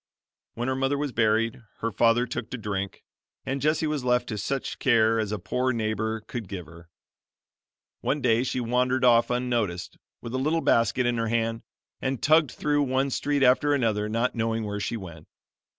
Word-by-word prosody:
When 120 Hz, +2 st, -3 dB
her 130 Hz, -, +1 dB
mother 135 Hz, +2 st, 0 dB
was 145 Hz, -1 st, -2 dB
buried, 115 Hz, +1 st, +1 dB, 0.2 s
her 115 Hz, -, -1 dB
father 115 Hz, +3 st, +3 dB
took 120 Hz, -, -5 dB
to 125 Hz, -, -5 dB
drink, 100 Hz, -3 st, -4 dB, 0.4 s
and 135 Hz, +1 st, -2 dB
Jessie 155 Hz, +2 st, +1 dB
was 150 Hz, -3 st, -1 dB
left 125 Hz, -1 st, +1 dB
to 110 Hz, -, -3 dB
such 135 Hz, +7 st, -3 dB
care 115 Hz, -3 st, +3 dB
as 105 Hz, -2 st, -2 dB
a 105 Hz, -, -1 dB
poor 125 Hz, +7 st, -1 dB
neighbor 110 Hz, -1 st, -2 dB
could 110 Hz, 0 st, -6 dB
give 90 Hz, -3 st, -6 dB
her. 85 Hz, +2 st, -15 dB, 1.1 s
One 150 Hz, -, -1 dB
day 120 Hz, -3 st, +3 dB
she 130 Hz, 0 st, -2 dB
wandered 125 Hz, +2 st, +1 dB
off 120 Hz, -1 st, +5 dB
unnoticed, 120 Hz, -8 st, -2 dB, 0.2 s
with 120 Hz, 0 st, -8 dB
a 130 Hz, -, 0 dB
little 155 Hz, +5 st, +1 dB
basket 120 Hz, 0 st, +2 dB
in 120 Hz, -1 st, +1 dB
her 115 Hz, 0 st, 0 dB
hand, 115 Hz, 0 st, 0 dB, 0.4 s
and 130 Hz, -2 st, -1 dB
tugged 155 Hz, -1 st, +4 dB
through 145 Hz, -1 st, 0 dB
one 135 Hz, 0 st, 0 dB
street 145 Hz, +1 st, 0 dB
after 140 Hz, +3 st, +4 dB
another, 110 Hz, -5 st, 0 dB
not 115 Hz, +3 st, 0 dB
knowing 115 Hz, -1 st, -1 dB
where 105 Hz, 0 st, -3 dB
she 110 Hz, +3 st, -2 dB
went. 85 Hz, -6 st, -10 dB
120 Hz, 185 wpm, -26 LUFS, 110-130 Hz, 1.1 s, off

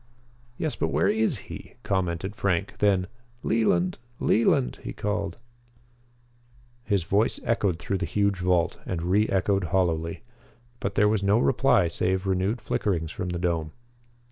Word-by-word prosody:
"Yes, 155 Hz, -, -2 dB
but -, -, -1 dB
where -, -, +2 dB
is 215 Hz, -, +2 dB
he?" -, -, -10 dB
commented 95 Hz, 0 st, -1 dB
Frank. 90 Hz, -1 st, -1 dB
Then: 100 Hz, -3 st, +3 dB, 0.4 s
"Leland! 95 Hz, -5 st, +1 dB, 0.2 s
Leland!" 65 Hz, -, +2 dB
he -, -, -6 dB
called. 105 Hz, -1 st, -2 dB, 1.5 s
His 100 Hz, -6 st, +1 dB
voice 100 Hz, +6 st, +1 dB
echoed 100 Hz, -7 st, +1 dB
through 95 Hz, +2 st, -2 dB
the -, -, -2 dB
huge 100 Hz, -2 st, +1 dB
vault 90 Hz, -1 st, +1 dB
and 85 Hz, -2 st, -2 dB
re 100 Hz, +5 st, +2 dB
echoed 95 Hz, 0 st, +1 dB
hollowly. 85 Hz, -1 st, 0 dB, 0.6 s
But 100 Hz, +1 st, -3 dB
there 105 Hz, -, +4 dB
was 105 Hz, -1 st, +1 dB
no 100 Hz, +2 st, +3 dB
reply 125 Hz, -5 st, +3 dB
save 95 Hz, +3 st, 0 dB
renewed 95 Hz, +5 st, 0 dB
flickerings 85 Hz, -7 st, -1 dB
from 90 Hz, -, -4 dB
the 90 Hz, -, -2 dB
dome. 85 Hz, -3 st, -1 dB
95 Hz, 140 wpm, -26 LUFS, 90-105 Hz, 1.5 s, there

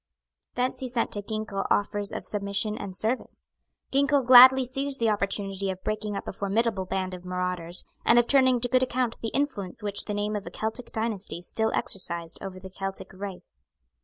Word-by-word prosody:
Thence 250 Hz, +1 st, -1 dB
he 260 Hz, -, -4 dB
sent 240 Hz, -1 st, -1 dB
to 205 Hz, -, -2 dB
Ginkell 215 Hz, -2 st, -3 dB
offers 205 Hz, 0 st, 0 dB
of -, -, -5 dB
submission 205 Hz, +1 st, 0 dB
and 195 Hz, -3 st, -6 dB
service. 230 Hz, +6 st, 0 dB, 0.4 s
Ginkell 280 Hz, 0 st, +3 dB
gladly 255 Hz, +1 st, +9 dB
seized 270 Hz, +2 st, -2 dB
the 225 Hz, -2 st, +3 dB
opportunity 195 Hz, -1 st, -1 dB
of 185 Hz, 0 st, -5 dB
breaking 215 Hz, -1 st, -2 dB
up -, -, -5 dB
a -, -, -4 dB
formidable 200 Hz, 0 st, 0 dB
band 185 Hz, 0 st, -2 dB
of 180 Hz, -1 st, -8 dB
marauders, 180 Hz, -1 st, -3 dB, 0.2 s
and 235 Hz, -, +5 dB
of 240 Hz, -, +6 dB
turning 260 Hz, -2 st, +4 dB
to 245 Hz, -, +1 dB
good 255 Hz, +1 st, +3 dB
account 250 Hz, -2 st, -1 dB
the 225 Hz, -, -2 dB
influence 225 Hz, -6 st, -2 dB
which 205 Hz, -1 st, -2 dB
the 210 Hz, -, -3 dB
name 210 Hz, +1 st, -1 dB
of 205 Hz, -, -4 dB
a -, -, -3 dB
Celtic 220 Hz, +3 st, -4 dB
dynasty 220 Hz, -5 st, -2 dB
still 220 Hz, +5 st, 0 dB
exercised 170 Hz, -3 st, -2 dB
over 190 Hz, -1 st, -7 dB
the 190 Hz, 0 st, -10 dB
Celtic 195 Hz, 0 st, -5 dB
race. 185 Hz, -, -9 dB
210 Hz, 190 wpm, -27 LUFS, 195-240 Hz, 0.4 s, gladly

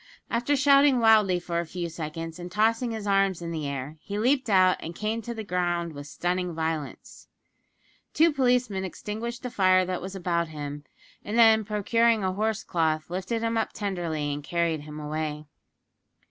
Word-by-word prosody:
After 240 Hz, +5 st, +1 dB
shouting 280 Hz, -1 st, +5 dB
wildly 215 Hz, -5 st, +5 dB
for 170 Hz, -1 st, -3 dB
a 170 Hz, -, -2 dB
few 175 Hz, +1 st, -4 dB
seconds, 165 Hz, +1 st, -6 dB
and 175 Hz, 0 st, -7 dB
tossing 225 Hz, +4 st, +2 dB
his 220 Hz, -2 st, -5 dB
arms 195 Hz, -2 st, +2 dB
in 170 Hz, -1 st, -5 dB
the 155 Hz, -3 st, -3 dB
air, 140 Hz, +2 st, -5 dB
he 205 Hz, -, -5 dB
leaped 255 Hz, +3 st, +1 dB
out 185 Hz, -2 st, +5 dB
and 165 Hz, +1 st, -7 dB
came 215 Hz, +4 st, -2 dB
to 235 Hz, +1 st, -6 dB
the 220 Hz, -, -5 dB
ground 175 Hz, -3 st, -1 dB
with 145 Hz, 0 st, -8 dB
stunning 175 Hz, +2 st, -2 dB
violence. 160 Hz, -2 st, -4 dB, 0.8 s
Two 325 Hz, 0 st, +4 dB
policemen 250 Hz, -7 st, +1 dB
extinguished 220 Hz, +6 st, -5 dB
the 250 Hz, -, -4 dB
fire 185 Hz, -2 st, +4 dB
that 185 Hz, 0 st, -3 dB
was 190 Hz, +1 st, -6 dB
about 170 Hz, -2 st, -1 dB
him, 145 Hz, -1 st, -7 dB, 0.4 s
and 210 Hz, +3 st, -3 dB
then, 220 Hz, -2 st, +6 dB
procuring 220 Hz, +2 st, +2 dB
a 185 Hz, 0 st, 0 dB
horse 220 Hz, +1 st, -1 dB
cloth 160 Hz, -2 st, -1 dB
lifted 190 Hz, +6 st, -2 dB
him 230 Hz, 0 st, +1 dB
up 225 Hz, -, -2 dB
tenderly 170 Hz, -8 st, -2 dB
and 145 Hz, 0 st, -6 dB
carried 170 Hz, -1 st, -1 dB
him 150 Hz, +1 st, -9 dB
away. 150 Hz, 0 st, -4 dB
185 Hz, 175 wpm, -26 LUFS, 165-225 Hz, 0.8 s, then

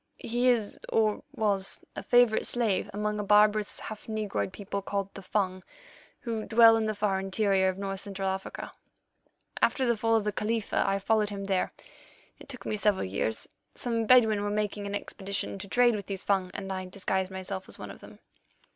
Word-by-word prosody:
"He 245 Hz, +2 st, +1 dB
is, 225 Hz, -4 st, 0 dB
or 215 Hz, -2 st, +2 dB
was, 200 Hz, -3 st, 0 dB
a -, -, -4 dB
favourite 245 Hz, -3 st, +4 dB
slave 225 Hz, -6 st, +1 dB
among 210 Hz, +1 st, -2 dB
a -, -, -1 dB
barbarous, 210 Hz, +1 st, +3 dB
half 215 Hz, +1 st, -8 dB
negroid 215 Hz, -3 st, -2 dB
people 200 Hz, +1 st, -5 dB
called 195 Hz, 0 st, -3 dB
the 195 Hz, -, -8 dB
Fung, 185 Hz, -1 st, -1 dB, 0.6 s
who 225 Hz, -3 st, -3 dB
dwell 225 Hz, 0 st, +7 dB
in 220 Hz, -1 st, 0 dB
the 215 Hz, -, -1 dB
far 200 Hz, -2 st, 0 dB
interior 195 Hz, 0 st, +2 dB
of 185 Hz, -, -3 dB
North 195 Hz, -1 st, -3 dB
Central 195 Hz, -1 st, -4 dB
Africa. 190 Hz, 0 st, -4 dB, 0.9 s
After 265 Hz, -, +3 dB
the 235 Hz, -1 st, +3 dB
fall 225 Hz, +1 st, +2 dB
of 220 Hz, -, +2 dB
the 210 Hz, -, 0 dB
Khalifa 215 Hz, +1 st, 0 dB
I 195 Hz, 0 st, +2 dB
followed 210 Hz, +1 st, +1 dB
him 200 Hz, -1 st, -5 dB
there; 190 Hz, -2 st, +1 dB, 0.7 s
it -, -, -14 dB
took 255 Hz, -3 st, -8 dB
me 215 Hz, -, -1 dB
several 205 Hz, -, +2 dB
years. 100 Hz, +4 st, -2 dB, 0.3 s
Some 230 Hz, -2 st, -1 dB
Bedouin 220 Hz, -4 st, +6 dB
were 205 Hz, -, -1 dB
making 205 Hz, -1 st, -2 dB
an 200 Hz, -, -3 dB
expedition 200 Hz, -1 st, -4 dB
to 200 Hz, -, -6 dB
trade 240 Hz, +2 st, +4 dB
with 200 Hz, -, -6 dB
these 195 Hz, -1 st, -4 dB
Fung, 190 Hz, -2 st, +1 dB
and 195 Hz, -1 st, -4 dB
I 185 Hz, 0 st, -4 dB
disguised 190 Hz, 0 st, -1 dB
myself 190 Hz, 0 st, -5 dB
as -, -, -6 dB
one -, -, -7 dB
of -, -, -12 dB
them. -, -, -13 dB
205 Hz, 190 wpm, -29 LUFS, 195-220 Hz, 0.9 s, dwell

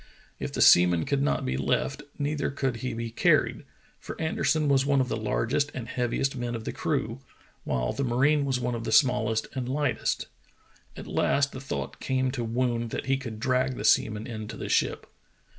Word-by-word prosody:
If -, -, -4 dB
the -, -, +2 dB
seaman 90 Hz, -1 st, +6 dB
could 140 Hz, -1 st, 0 dB
not 145 Hz, -, 0 dB
be 65 Hz, -, -1 dB
left, 70 Hz, -, 0 dB, 0.2 s
neither 145 Hz, 0 st, -1 dB
could 135 Hz, -3 st, -2 dB
he 125 Hz, 0 st, -4 dB
be 115 Hz, 0 st, -4 dB
carried, -, -, +2 dB, 0.3 s
for -, -, -8 dB
Anderson 160 Hz, -1 st, +1 dB
was 135 Hz, -2 st, +4 dB
one 140 Hz, 0 st, +2 dB
of 130 Hz, -1 st, 0 dB
the -, -, -1 dB
largest 115 Hz, +6 st, 0 dB
and 120 Hz, -3 st, -5 dB
heaviest 125 Hz, +3 st, -1 dB
men 120 Hz, -1 st, -3 dB
of 115 Hz, -, -5 dB
the -, -, -4 dB
crew, -, -, -2 dB, 0.5 s
while -, -, -1 dB
the 140 Hz, -, -2 dB
marine 140 Hz, +4 st, +2 dB
was 135 Hz, -2 st, 0 dB
one 125 Hz, 0 st, -2 dB
of 115 Hz, -1 st, -4 dB
the -, -, -3 dB
small 125 Hz, -6 st, +4 dB
est 110 Hz, -1 st, 0 dB
and 130 Hz, -2 st, -3 dB
hghtest. 140 Hz, -1 st, -1 dB, 0.7 s
At -, -, -7 dB
last 140 Hz, 0 st, +1 dB
the 130 Hz, -, -8 dB
thought 135 Hz, -, -5 dB
came 130 Hz, -1 st, 0 dB
to 125 Hz, -3 st, -3 dB
Woon 120 Hz, 0 st, -1 dB
that 115 Hz, -, -4 dB
he 135 Hz, 0 st, +2 dB
could 115 Hz, -5 st, -6 dB
drag 130 Hz, +1 st, +1 dB
the 105 Hz, -, -4 dB
seaman 110 Hz, 0 st, +3 dB
in 110 Hz, -2 st, -6 dB
to -, -, -7 dB
the -, -, -5 dB
ship. -, -, +1 dB
125 Hz, 205 wpm, -27 LUFS, 115-135 Hz, 0.7 s, seaman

